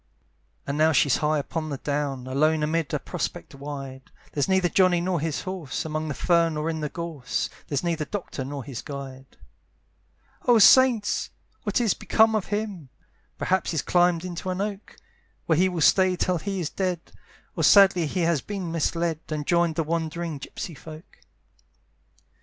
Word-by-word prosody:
And 140 +2 -3
now 160 +1 +4
she's 140 -1 +3
high 155 0 +1
upon 155 +2 -3
the 140 - -3
down, 140 -2 -2
Alone 150 +4 +1
amid 160 0 -1
a - - +1
prospect - - -5
wide; 135 -2 -8 0.2
There's 145 - 0
neither 190 -1 +3
Johnny 180 +1 +3
nor 180 0 0
his 155 -1 -2
horse, 185 -8 -4
Among 155 0 -3
the 150 - -3
fern 165 -1 +2
or 155 +2 -1
in 160 - -4
the 150 -1 -3
gorse; 160 -6 -4 0.2
There's 145 +1 -2
neither 165 -3 -1
doctor 180 -8 -5
nor 140 0 -6
his 130 -3 -6
guide. 135 -2 -9 1.1
"Oh 240 -1 +6
saints! 235 -1 +5 0.3
what - - 0
is 230 -5 +2
become 220 0 +3
of 215 -3 -1
him? 205 -8 -4 0.5
"Perhaps 190 -1 0
he's 160 -4 -1
climbed 175 -1 +2
into 180 +1 -5
an 185 0 -2
oak, 200 0 -5 0.5
"Where 160 -1 +2
he 185 +1 +4
will 175 -3 -3
stay 185 +3 +4
till 180 0 0
he 195 +3 -3
is 165 -4 -3
dead; 180 -3 -3 0.4
"Or - - -1
sadly 190 -5 +6
he 180 +5 -2
has 165 -4 +2
been 195 -5 -5
misled, 165 0 -1
"And 150 -2 -3
joined 170 -1 +2
the 165 - 0
wandering 165 -1 -3
gypsey 165 - -7
folk. 155 +4 -12
165 Hz, 170 wpm, -25 LUFS, 150-185 Hz, 1.1 s, Oh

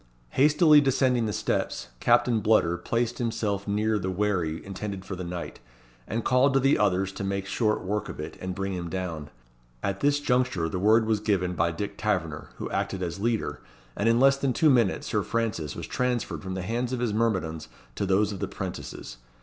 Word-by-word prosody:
Hastily 150 - +5
descending 130 -4 +2
the - - -1
steps, 100 - -2
Captain 115 -3 +3
Bludder 100 -5 +3
placed 120 0 -1
himself 110 -4 -1
near 105 +1 +1
the 95 0 -2
wherry 90 -5 -1
intended 100 0 -5
for 95 - -5
the 90 - -5
knight, 85 0 -6 0.5
and 115 +2 -3
called 130 +2 +3
to - - +6
the 135 +2 +3
others 95 -2 +2
to 100 - -6
make 100 0 -2
short 105 +1 0
work 105 +3 -2
of - - -8
it 75 +1 -6
and 95 0 -4
bring 95 0 -2
him 85 -2 -4
down. 85 -5 -4 0.5
At 100 0 -1
this 145 0 +2
juncture 125 -11 +1
the 90 +3 -3
word 110 +3 +4
was 110 -1 +1
given 90 -4 0
by 85 0 +1
Dick 100 +4 -5
Taverner, 90 -8 -1
who - - -5
acted 95 -1 -2
as 85 +2 -4
leader, 115 +1 -1 0.3
and 115 - +1
in 115 +1 +4
less 135 +1 +5
than 135 -2 0
two 155 +2 +4
minutes, 115 -7 +2
Sir - - 0
Francis 110 -10 -2
was - - -5
transferred 125 -2 -1
from 95 -1 -5
the 95 - -3
hands 120 +5 -2
of 125 - -1
his 120 -3 0
myrmidons 95 -8 -1 0.3
to 100 - -2
those 100 +2 +2
of 100 - -6
the 100 - -2
'prentices. 90 -10 -7
105 Hz, 200 wpm, -27 LUFS, 95-120 Hz, 0.5 s, to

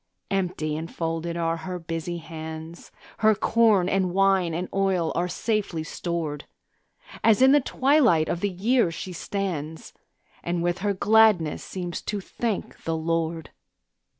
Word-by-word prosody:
Empty 175 -6 -1
and 160 +2 -5
folded 165 +1 -3
are 165 0 0
her 180 +3 -5
busy 165 0 -4
hands; 160 0 -8 0.3
Her 215 -1 +5
corn 215 -5 +3
and 190 -1 +1
wine 195 -3 +3
and 180 +2 -2
oil 190 -4 +1
are 175 +1 0
safely 190 -3 -2
stored, 160 -3 -4 0.8
As 225 -2 +5
in 260 +1 +7
the 290 0 +5
twilight 255 - +3
of 170 - -1
the 205 - 0
year 215 +3 +2
she 180 +2 -6
stands, 165 -4 -4 0.5
And 170 0 -2
with 175 +1 0
her 200 +1 0
gladness 210 -6 +4
seems 175 -2 -5
to 210 - -3
thank 215 +2 -4
the 165 0 -1
Lord. 165 0 -2
175 Hz, 145 wpm, -25 LUFS, 165-200 Hz, 0.8 s, in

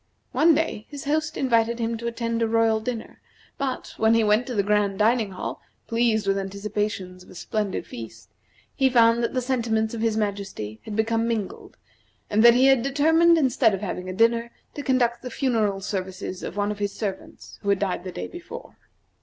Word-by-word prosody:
One 320 0 +4
day 300 -9 -2
his 285 -2 -8
host 310 +2 -1
invited 235 -3 +2
him 230 0 -1
to 235 - -4
attend 230 0 -2
a 230 - +2
royal 225 -1 +2
dinner, 230 0 -6 0.4
but, 270 -2 -3
when 220 +1 +4
he 230 - +3
went 215 +3 +2
to 250 - -4
the 200 - +2
grand 205 -1 +1
dining 220 0 +2
hall, 185 - -5 0.2
pleased 230 -2 +1
with 195 0 +1
anticipations 195 -2 -4
of - - -19
a - - -13
splendid 210 +1 -3
feast, 115 -2 -10 0.4
he 265 -2 +3
found 235 -1 +4
that 235 - -2
the 255 - 0
sentiments 230 -3 0
of 230 - -4
his 225 -1 +1
majesty 200 - -4
had 215 - -5
become 225 +1 +1
mingled, 220 -4 -4 0.5
and 210 - +3
that 235 0 +8
he 255 +2 +5
had 270 -2 +5
determined, 320 +5 +4
instead 250 -7 +3
of 190 - -8
having 185 -2 -4
a - - -4
dinner, 230 +3 +2 0.2
to 290 - -5
conduct 245 -3 +1
the 250 - -6
funeral 220 -8 0
services 190 -1 -4
of 200 - -6
one 205 0 0
of 210 - -6
his 205 -1 -2
servants 195 -3 -6
who 200 - -3
had 200 - +4
died 190 -2 -2
the 185 - -6
day - - -5
before. 350 +1 -10
225 Hz, 200 wpm, -24 LUFS, 205-245 Hz, 0.5 s, that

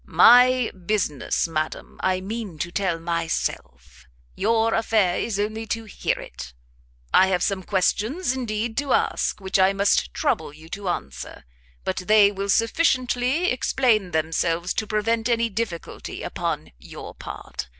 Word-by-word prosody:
"My 250 0 +6
business, 185 -5 -1
madam, 155 -1 -4
I 185 0 +1
mean 205 -3 -5
to 175 +3 -3
tell 185 -3 0
myself; 165 - -4 0.3
your 225 +1 +2
affair 220 -5 +2
is 210 -4 -2
only 220 +2 -2
to 225 +1 -2
hear 210 - -2
it. - - -9 0.6
I 190 - +6
have 180 -2 +1
some 195 -2 0
questions, 220 - 0
indeed, 225 -2 -3
to 280 -1 +1
ask, - - 0
which 190 0 0
I 190 +1 +5
must 200 0 +2
trouble 155 -2 -1
you 160 +2 -14
to 195 +1 -4
answer, 70 - -5 0.4
but - - -2
they 205 +2 +5
will 200 0 -4
sufficiently 255 - +2
explain 240 -6 +1
themselves 165 +2 0
to 215 - -2
prevent 225 +2 0
any 230 -1 +2
difficulty 205 -5 -5
upon - - -3
your 60 - -10
part. 65 - -7
205 Hz, 140 wpm, -24 LUFS, 180-230 Hz, 0.6 s, My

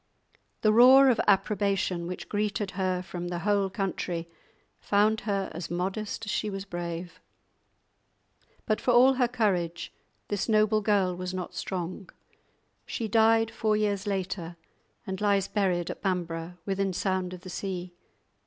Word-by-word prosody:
The 215 -1 +4
roar 260 +4 +8
of 235 - +1
approbation 195 -3 +1
which 180 - -6
greeted 205 -1 -1
her 185 -1 -1
from 175 -1 -6
the 175 0 -3
whole 200 -2 +2
country 180 -3 -3 0.5
found 210 +2 +2
her 195 -1 -1
as 165 +1 -6
modest 195 +5 -3
as 215 - -3
she 215 - -1
was 195 -1 -5
brave. 175 -1 -6 1.5
But 215 - 0
for - - -1
all 250 +2 +6
her 250 -2 +2
courage, 185 -8 -1 0.3
this 205 +1 -2
noble 215 0 +3
girl 195 -3 +2
was 180 +1 -5
not 180 -1 -5
strong. 185 +1 -5 0.8
She 225 - -3
died 225 +1 +4
four 215 -2 +1
years 205 -1 -1
later, 185 -3 -3 0.5
and 190 -1 -5
lies 200 -2 +2
buried 180 -4 0
at - - -9
Bamburgh, 175 -2 -3
within 195 -1 -1
sound 185 0 -1
of 180 - -13
the 185 -1 -9
sea. 180 -2 -5
195 Hz, 145 wpm, -28 LUFS, 180-215 Hz, 1.5 s, roar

